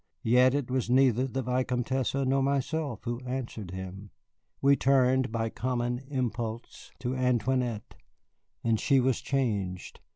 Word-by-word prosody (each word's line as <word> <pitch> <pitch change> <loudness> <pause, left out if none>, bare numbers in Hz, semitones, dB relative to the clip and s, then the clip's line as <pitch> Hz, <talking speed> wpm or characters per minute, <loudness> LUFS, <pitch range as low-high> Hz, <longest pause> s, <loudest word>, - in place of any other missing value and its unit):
Yet 125 +3 +4
it 140 -3 -2
was 130 -3 -1
neither 130 0 +4
the 135 0 -3
Vicomtesse 125 +1 -1
nor 135 0 +1
myself 140 -2 -1
who 120 -1 -3
answered 125 -6 -5
him. 95 +2 -7 0.5
We 140 +1 +5
turned 130 -2 +3
by 115 0 -1
common 120 +1 -2
impulse 120 -4 -4
to 125 +1 -2
Antoinette, 125 -2 0 0.7
and 115 -2 +2
she 135 +3 +3
was 130 -1 +1
changed. 100 -9 -2
125 Hz, 130 wpm, -29 LUFS, 115-130 Hz, 0.7 s, We